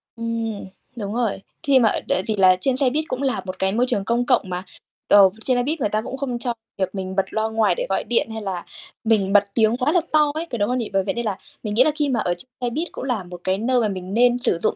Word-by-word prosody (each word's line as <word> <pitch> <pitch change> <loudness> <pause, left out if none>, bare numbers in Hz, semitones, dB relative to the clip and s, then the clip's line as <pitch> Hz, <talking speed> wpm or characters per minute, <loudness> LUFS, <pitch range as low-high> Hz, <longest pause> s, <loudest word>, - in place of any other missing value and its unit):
Ừm. 230 -2 -3 0.3
Đúng 205 -3 -4
rồi. 230 -5 -1 0.2
Khi 280 -4 +5
mà 225 -3 +4 0.2
tại 185 - +1
vì 220 - 0
là 185 -1 +6
trên 265 +2 +1
xe 265 -2 +3
buýt 305 +4 -1
cũng 255 - -3
là 270 -2 0
một 185 0 -6
cái 190 0 +1
môi 235 +5 +2
trường 200 -5 0
công 240 +3 +1
cộng 245 -7 +2
mà, 180 0 -3 0.4
ờ, 200 -2 +7
trên 255 -2 +2
xe 245 - +2
buýt 305 +5 -2
người 225 - 0
ta 215 +1 0
cũng 265 - -6
không 260 -3 -3
cho 240 0 -1 0.2
việc 190 0 -2
mình 190 -1 -4
bật 195 - +2
loa 220 0 -1
ngoài 220 0 +2
để - - -2
gọi - - 0
điện, 235 -1 0
hay 220 - -5
là 190 -4 -4 0.4
mình 210 -4 +2
bật 205 -1 +7
tiếng 225 +1 +3
quá 255 +3 +1
là 355 - +3
to 300 -1 +4
ấy, 320 +2 -2
có 240 - -3
đúng 205 0 0
không 250 - 0
nhỉ? 235 -3 -3
Bởi 195 0 +2
vậy - - -1
nên 235 -2 -3
là 200 -3 -1 0.3
mình 210 -2 -3
nghĩ 235 +4 +6
là 305 - +2
khi 295 -2 0
mà 245 -3 +1
ở 175 - 0
trên 175 - -9
xe 245 - 0
buýt 315 +8 -2
cũng - - -7
là 245 -7 -1
một 175 0 -10
cái 190 0 +1
nơi 245 +4 +1
mà 220 - +2
mình 185 -1 -5
nên 245 +2 +4
sử 210 - +1
dụng - - 0
230 Hz, 295 wpm, -22 LUFS, 195-255 Hz, 0.4 s, ờ